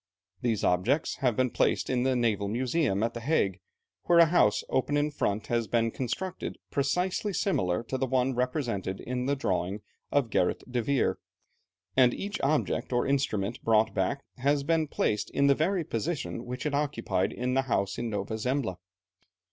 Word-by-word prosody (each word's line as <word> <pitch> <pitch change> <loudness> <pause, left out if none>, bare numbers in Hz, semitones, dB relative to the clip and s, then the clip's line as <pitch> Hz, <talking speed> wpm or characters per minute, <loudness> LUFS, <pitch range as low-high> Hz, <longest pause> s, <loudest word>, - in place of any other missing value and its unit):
These 115 -4 0
objects 110 - +1
have 125 -4 +1
been 130 0 +1
placed - - +1
in 125 -1 +1
the 130 0 +2
Naval 110 -4 +1
Museum 120 -1 0
at 115 0 0
the 120 - -5
Hague, 115 - +1 0.5
where 170 - +4
a 170 - +9
house, 155 -11 +3
open 145 +3 0
in 150 +1 +1
front, 105 -6 -1
has 115 -2 0
been 115 -1 +1
constructed 165 +11 -4
precisely 180 +8 0
similar 95 - 0
to 130 +3 -4
the 130 - 0
one 130 +1 +1
represented 120 -7 -2
in 125 +1 -3
the 140 - +2
drawing 95 -5 -1 0.3
of 135 -6 +1
Gerrit 90 - +1
de 125 -1 -1
Veer, 140 +2 +1 0.8
and 125 -2 +5
each 205 +1 -4
object 145 0 0
or 120 -1 +1
instrument 120 -6 0
brought 110 -1 +3
back 95 +10 -1 0.2
has 140 +2 +2
been 160 +1 +1
placed 105 -6 -1
in 140 - +1
the 140 - +6
very 170 +5 0
position 135 -1 -3
which 125 +3 -5
it 150 - -1
occupied 115 -10 0
in 125 +1 -2
the 135 - +3
house 100 -3 0
in 120 -1 -2
Nova 105 +1 -3
Zembla. 125 -5 -1
125 Hz, 175 wpm, -28 LUFS, 110-140 Hz, 0.8 s, a